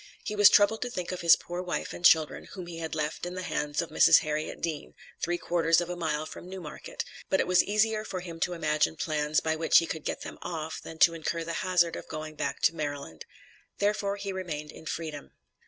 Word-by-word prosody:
He 210 - -4
was 205 -1 +8
troubled 210 +2 +4
to 245 - -2
think 180 -7 -4
of 185 - -4
his 170 -1 +8
poor 175 +1 -6
wife 180 -1 -3
and 175 - -9
children, 160 -3 +4
whom 185 -3 -7
he 170 -1 -8
had 160 -1 -4
left 150 0 -3
in 175 +1 -4
the 185 - -4
hands 150 -1 -1
of 170 - -10
Mrs. - - +7
Harriet 155 0 -3
Dean, 160 -3 -4 0.3
three 175 0 0
quarters 165 -1 +2
of 175 0 -3
a - - -3
mile 155 -3 -2
from 175 - -10
New 190 0 -6
Market; 475 - -7 0.2
but 190 - +2
it - - +2
was 180 0 +4
easier 215 +1 +1
for 190 -4 -5
him 170 -2 -8
to 175 - 0
imagine 155 -1 +1
plans 155 -1 0
by 160 0 0
which 160 +1 +4
he 165 - +5
could 160 -2 -5
get - - -3
them - - -8
off 160 -2 -5
than 160 - -9
to 170 - +6
incur 165 +1 -3
the 165 0 -4
hazard 180 -2 +2
of - - -8
going 155 0 -6
back 150 - -3
to 165 - +3
Maryland; 145 - -5 0.5
therefore 205 -1 0
he 200 -1 -5
remained 155 -5 -5
in 160 - -12
freedom. 155 - -5
170 Hz, 235 wpm, -28 LUFS, 155-185 Hz, 0.5 s, was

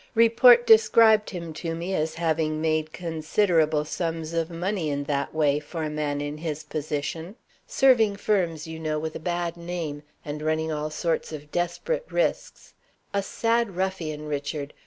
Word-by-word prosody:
Report 230 +1 +6
described 220 -1 +6
him 170 -4 -6
to 165 +1 -4
me 175 +3 -4
as 160 -2 -1
having 160 -2 0
made 155 0 0
considerable 160 -1 +1
sums 165 0 -3
of 165 0 -1
money 175 0 -2
in 145 0 -2
that 140 -1 -2
way, 150 -2 +2
for 160 +2 -6
a 155 - -2
man 150 -1 -2
in 145 +1 -5
his 155 -1 -4
position; 155 +4 -4 0.3
serving 230 -6 +4
firms, 180 -7 0
you 160 0 -7
know, 155 -1 -2
with 160 +1 -4
a - - -4
bad 175 0 -2
name, 170 -4 -5 0.2
and 150 0 -5
running 155 +1 0
all 150 0 -2
sorts 165 +1 -2
of 150 -1 -9
desperate 475 - -2
risks. - - -2 0.4
A 200 - +1
sad 230 0 0
ruffian, 175 -5 -3
Richard! 145 0 -4
160 Hz, 160 wpm, -25 LUFS, 155-185 Hz, 0.4 s, Report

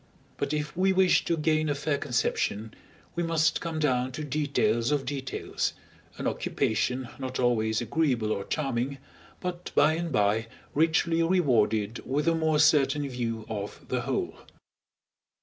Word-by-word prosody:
But - - -2
if 150 +1 -2
we 190 +2 +3
wish 190 -1 +4
to 170 - +1
gain 155 0 +1
a 145 - +1
fair 145 0 -1
conception, 115 -4 -1 0.4
we 175 - -2
must 165 -1 +2
come 165 -2 -3
down 130 -4 +1
to 155 - -4
details 145 - +1
of 145 -2 0
details, 135 -2 -3 0.4
an - - -5
occupation 125 +3 0
not 130 -1 -4
always 110 -3 +2
agreeable 120 -3 0
or 100 - -1
charming, 135 0 -2 0.4
but 180 -1 -4
by 150 +2 +5
and 170 0 -3
by 105 0 +2 0.3
richly 165 +2 +2
rewarded 115 - +2
with 145 +4 -1
a 165 - +5
more 160 -1 +2
certain 145 -1 +4
view 115 -4 -3
of 105 -2 -6
the - - 0
whole. - - -2
140 Hz, 150 wpm, -28 LUFS, 120-160 Hz, 0.4 s, by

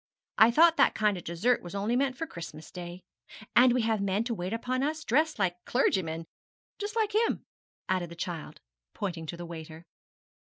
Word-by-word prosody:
I 220 - +9
thought 330 +7 +5
that - - +4
kind 210 -2 +2
of 180 - -7
dessert 205 +9 +1
was 175 +2 -8
only 205 +4 0
meant 265 0 +1
for 325 - -2
Christmas 160 - -9
Day. 175 0 -7 0.5
And 250 +1 +7
we 245 -1 +2
have 220 -2 +1
men 200 +2 +1
to 235 0 -2
wait 185 -3 -4
upon 250 +3 -1
us, 310 +2 -1
dressed 310 +5 +2
like 180 -3 -1
clergymen, 165 -10 0 0.5
just 415 +1 -4
like 435 -2 +1
him,' 450 +2 +1 0.4
added 185 -2 0
the 170 - -9
child, 170 -2 -6 0.3
pointing 170 -5 -4
to 170 - -5
the 175 - -6
waiter. 160 -1 -9
205 Hz, 190 wpm, -29 LUFS, 175-255 Hz, 0.5 s, I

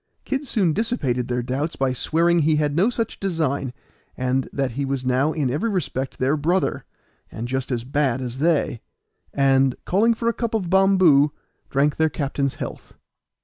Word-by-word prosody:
Kid 270 +1 -2
soon 190 -9 +2
dissipated 145 - -1
their 125 0 -1
doubts 140 +6 -2
by 135 -1 0
swearing 170 +6 +2
he 155 0 +3
had 150 -1 0
no 190 +8 +3
such 230 -2 -3
design, 155 -8 -1 0.5
and 130 +1 0
that 135 -3 -1
he 140 +4 -3
was 135 -1 -2
now 130 +4 +2
in 145 -6 -1
every 185 - -1
respect 140 - -3
their 135 +4 +1
brother, 170 +5 0 0.5
and 115 +2 -5
just 130 +1 -3
as 120 -2 -1
bad 135 -1 0
as 125 0 -5
they, 150 -6 +1 0.5
and, 135 -2 +3
calling 225 +5 +3
for 230 +1 -3
a 235 - +3
cup 230 -1 -2
of 185 -5 -2
bomboo, 185 -7 +5 0.4
drank 140 +2 +1
their 160 0 +3
captain's 140 -2 -2
health. - - -8
145 Hz, 175 wpm, -23 LUFS, 130-175 Hz, 0.5 s, bomboo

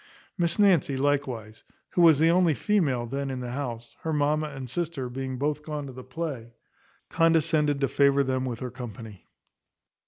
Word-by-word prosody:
Miss 170 -3 0
Nancy 180 -10 +3
likewise, 130 -6 -1 0.3
who 175 - +2
was 165 -4 +7
the 160 +3 +4
only 175 -3 +3
female 150 - +1
then 135 +3 -3
in 130 -1 -4
the 125 -1 -5
house, 120 -3 -5
her 160 - -3
mamma 150 +1 +1
and 135 -2 -7
sister 155 -2 -3
being 130 +1 -4
both 150 +2 -1
gone 150 -1 -5
to 135 - -8
the 130 0 -9
play, 130 -5 -6 0.6
condescended 160 -3 +2
to 135 - +3
favour 140 +1 +3
them 130 -1 -1
with 125 -2 -4
her 125 -1 -4
company. 110 -5 -9
140 Hz, 175 wpm, -27 LUFS, 125-155 Hz, 0.6 s, was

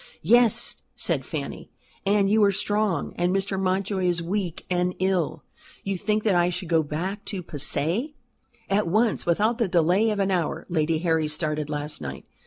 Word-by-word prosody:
"Yes," 240 -1 +4 0.2
said - - -1
Fanny. - - -6 0.4
"And 200 0 +3
you 215 +1 +4
are 200 - +4
strong, 205 -1 -1
and 175 +1 +1
Mr. 195 0 0
Mountjoy 190 0 0
is 175 -1 +1
weak 175 0 -3
and 180 0 0
ill." 185 -4 0 0.4
"You 195 0 -2
think 210 +3 -1
that 210 - +2
I 175 0 +3
should 180 -1 -5
go 165 -1 +4
back 180 +7 -4
to 190 -4 -4
Passy?" 165 - 0 0.5
"At 200 -1 +1
once, 215 +4 +1
without 215 +7 +2
the 230 - +2
delay 180 +5 +3
of 210 - -1
an 195 -1 +1
hour. 175 -4 -1
Lady 160 -1 +1
Harry 160 -2 +1
started 150 -1 -2
last 150 - -3
night. 70 -2 -7
185 Hz, 175 wpm, -25 LUFS, 165-205 Hz, 0.5 s, Yes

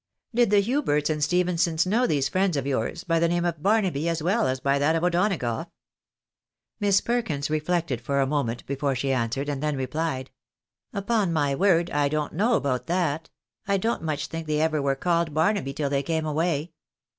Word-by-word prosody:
" - - -56
Did 240 -1 +3
the 205 0 +4
Huberts 195 - +1
and 150 -1 -1
Stephensons 170 -1 +1
know 230 +7 +2
these 140 -3 +1
friends 185 -4 +1
of 135 - -2
yours 140 +5 -2
by 165 -1 +1
the 170 - +3
name 175 +1 0
of 170 -3 -2
Barnaby 185 -6 +1
as 165 -2 -2
well 205 +6 +2
as 130 0 -1
by 140 +1 +1
that 150 +3 +2
of 165 - -1
O'Donagough? 175 - 0 0.6
" - - -63
Miss 200 -1 +3
Perkins 170 -13 -1
reflected 155 -4 -1
for 140 +3 -1
a 135 - +3
moment 130 -5 -2
before 140 0 -1
she 135 +2 0
answered, 130 +3 -1
and 140 -2 -3
then 150 -2 -1
replied— 130 0 -3 0.3
" - - -64
Upon 200 -2 0
my 145 -4 +1
word 175 +2 +2
I 145 -1 +1
don't 150 0 -2
know 225 +8 +2
about 125 - -1
that 165 -3 -1 0.2
— 215 - -41
I 200 -1 +2
don't 225 +5 -1
much 155 -2 -2
think 165 0 -6
they 150 0 0
ever 155 -1 +1
were 140 -1 +1
called 170 0 0
Barnaby 165 -2 +1
till 140 0 -2
they 140 -1 +1
came 160 +1 -1
away." 155 +1 -1
160 Hz, 205 wpm, -25 LUFS, 140-180 Hz, 0.6 s, the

